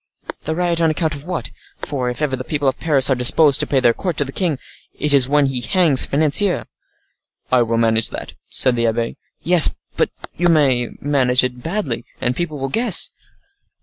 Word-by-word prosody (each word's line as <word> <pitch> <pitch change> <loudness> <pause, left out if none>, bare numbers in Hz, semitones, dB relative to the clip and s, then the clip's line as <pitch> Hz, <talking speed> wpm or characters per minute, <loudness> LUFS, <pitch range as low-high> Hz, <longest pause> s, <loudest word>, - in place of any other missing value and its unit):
"The 160 - -2
riot 170 -1 -1
on 165 - +3
account 155 0 -1
of 145 0 -7
what? 170 -11 -5 0.3
For, 130 -4 -4
if 125 +5 -4
ever 135 -3 -1
the 130 - -7
people 145 0 -3
of 135 - -1
Paris 140 -5 +2
are - - +3
disposed 135 +4 +4
to - - -2
pay 135 - +1
their 120 -2 +3
court 180 +2 -4
to 145 - +1
the 135 - -8
king, 165 -3 -2 0.4
it 150 -1 -2
is 135 -2 +5
when 145 0 +2
he 135 -2 -3
hangs 170 -5 +3
financiers." 155 +6 +1 0.9
"I 125 -1 +4
will 115 -1 -1
manage 115 -1 +2
that," - - -8 0.2
said 130 -2 +2
the 115 -1 0
abbe. 115 +1 -3 0.3
"Yes; 175 -1 +6 0.3
but - - +1 0.3
you 175 +1 +1
may 135 -7 +2
manage 130 -3 +1
it 125 -1 -4
badly, 165 - -3 0.2
and 125 +1 -2
people 155 -2 -4
will 135 0 -4
guess." 225 - +4
140 Hz, 200 wpm, -18 LUFS, 125-160 Hz, 0.9 s, Yes